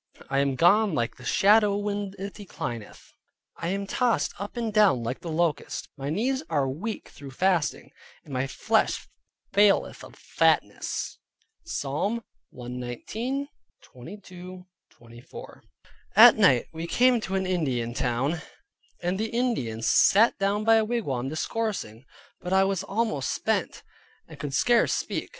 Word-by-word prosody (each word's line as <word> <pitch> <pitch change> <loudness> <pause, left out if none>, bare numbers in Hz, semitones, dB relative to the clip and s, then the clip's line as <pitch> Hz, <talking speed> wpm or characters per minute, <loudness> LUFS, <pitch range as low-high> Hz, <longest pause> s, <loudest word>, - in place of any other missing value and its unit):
I 135 - +2
am 140 -1 +1
gone 195 - +4
like 120 -5 -2
the - - -13
shadow 210 0 +4
when 205 -1 -3
it 200 +1 -6
declineth: 120 - -8 0.4
I 165 - -4
am 200 +2 -2
tossed 240 +3 0
up 205 +5 -6
and 230 -2 -2
down 200 - +4
like 120 +3 -3
the 170 - -7
locust; 165 -1 -1
my 140 0 -5
knees 250 - 0
are 145 -4 +1
weak 175 +12 -5
through 140 -1 -11
fasting, 175 +2 0 0.3
and 145 - -11
my 130 +1 -1
flesh - - 0 0.5
faileth 205 0 +3
of - - -12
fatness" - - 0 0.5
(Psalm 205 - -2 0.3
119.22 180 - -7 0.2
24). 120 +1 -13 0.5
At - - +10
night 125 -2 +4
we 165 +1 -5
came 245 +4 +4
to 190 -2 -3
an 190 0 0
Indian 130 -10 -1
town, 135 +7 -1 0.6
and 180 +2 -1
the 220 +1 -1
Indians 175 - -1
sat 220 +4 +5
down 200 +2 0
by 225 +1 +5
a 220 - +3
wigwam 145 - -2
discoursing, 155 - -3 0.3
but 180 - -6
I 190 0 +5
was 195 -2 0
almost 195 - -1
spent, - - -2 0.4
and - - -13
could 140 -2 -4
scarce 240 -1 +3
speak. - - -3
185 Hz, 140 wpm, -26 LUFS, 135-215 Hz, 0.6 s, At